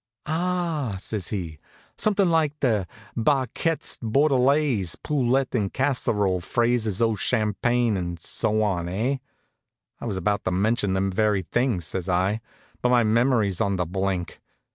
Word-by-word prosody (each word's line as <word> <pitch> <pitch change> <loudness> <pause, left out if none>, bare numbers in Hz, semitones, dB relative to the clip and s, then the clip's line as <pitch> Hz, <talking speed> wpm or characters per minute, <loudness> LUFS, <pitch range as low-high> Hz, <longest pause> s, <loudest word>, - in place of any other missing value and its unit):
"Ah!" 165 - -1
says 100 -1 -3
he, 85 -7 -4 0.4
"something 205 -3 +2
like 155 -3 +1
Barquettes 125 - -1
Bordellaise, 130 - +2
poulet 135 -2 0
en 105 -6 0
casserole, 105 -9 0
fraises 115 0 +1
au 115 -1 +3
champagne, 115 +2 +1
and 85 -2 -3
so 110 +5 0
on, 90 -4 -1
eh?" 115 +9 0 0.8
"I - - -7
was 100 -4 -2
about 100 +2 0
to - - +1
mention 105 +2 +1
them 95 +1 0
very 105 0 +1
things," 110 - 0
says 95 +3 -4
I. 95 +5 +1 0.4
"But 125 - +2
my 125 -1 +4
memory's 110 -4 +2
on 100 -1 +1
the 90 -1 -1
blink. 95 0 -3
110 Hz, 135 wpm, -25 LUFS, 95-130 Hz, 0.8 s, my